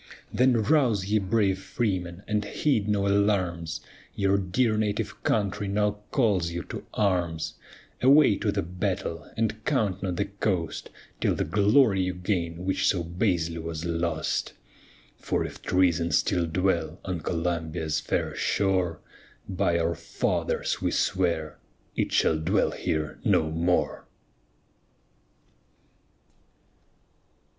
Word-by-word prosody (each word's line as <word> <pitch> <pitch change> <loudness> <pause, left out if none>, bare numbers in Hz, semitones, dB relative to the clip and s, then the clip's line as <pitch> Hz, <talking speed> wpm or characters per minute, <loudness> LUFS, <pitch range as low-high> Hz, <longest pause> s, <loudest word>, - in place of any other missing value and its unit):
Then 125 -3 +3
rouse 120 -9 +3
ye 105 +2 +2
brave 95 -1 +1
freemen, 95 -3 -2
and 105 -1 0
heed 110 -1 0
no 100 -1 +1
alarms, 95 -5 +1 0.3
Your 100 -1 +2
dear 110 +5 +1
native 105 0 -2
country 100 -1 0
now 105 +1 0
calls 100 - +2
you 85 0 -4
to - - -7
arms, 90 -6 0 0.5
Away 135 -4 +6
to 105 - 0
the - - -1
battle, 90 -3 -3
and 110 -1 -1
count 105 -10 0
not 90 -3 -2
the 100 - 0
cost 100 -4 -2 0.3
Till - - +1
the - - 0
glory 105 0 +4
you 90 0 -1
gain, 90 -2 -2
which 95 - +1
so 85 -3 +2
basely 85 -2 -1
was 80 0 -5
lost. 85 -2 -1 0.6
Chorus - - -36
For - - -1
if - - -8
treason 85 -2 +2
still 90 -4 +2
dwell 85 -1 0
on 90 -3 -2
Columbia's 80 -1 -2
fair - - -1
shore, 90 -5 0 0.5
By 85 -3 +1
our 85 0 +1
fathers - - -1
we - - +1
swear 85 -5 0 0.4
it - - 0
shall 80 - +3
dwell 80 - +1
here 75 -2 -2
no 80 0 +2
more. 85 +3 0
95 Hz, 125 wpm, -27 LUFS, 85-105 Hz, 0.6 s, Away